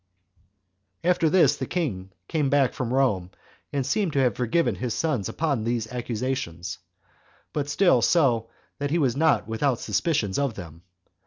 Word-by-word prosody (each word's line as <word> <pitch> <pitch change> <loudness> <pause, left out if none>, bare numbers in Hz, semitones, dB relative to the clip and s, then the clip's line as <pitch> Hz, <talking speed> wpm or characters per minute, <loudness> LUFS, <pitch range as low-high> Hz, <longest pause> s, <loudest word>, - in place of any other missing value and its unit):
4. 180 - +4
After 165 -2 +2
this 185 +2 +4
the - - -4
king 110 - -2 0.2
came 150 -4 0
back 140 -2 +3
from 120 -2 -3
Rome, 120 -10 +1 0.4
and 140 -2 -1
seemed 175 +4 0
to 140 - +1
have 125 -5 +2
forgiven 125 +8 +1
his 125 -3 -3
sons 140 - -1
upon 140 -8 -1
these 115 -1 -1
accusations; 120 -7 -3 0.7
but 145 -1 -2
still 160 -4 +4
so 120 -7 +2 0.3
that 145 0 -1
he 165 - +1
was 135 -7 +1
not 155 -6 +2
without 120 +4 +1
his - - -8
suspicions 105 - 0
of 140 -6 -1
them. 85 -4 -10
130 Hz, 165 wpm, -25 LUFS, 110-150 Hz, 0.7 s, 4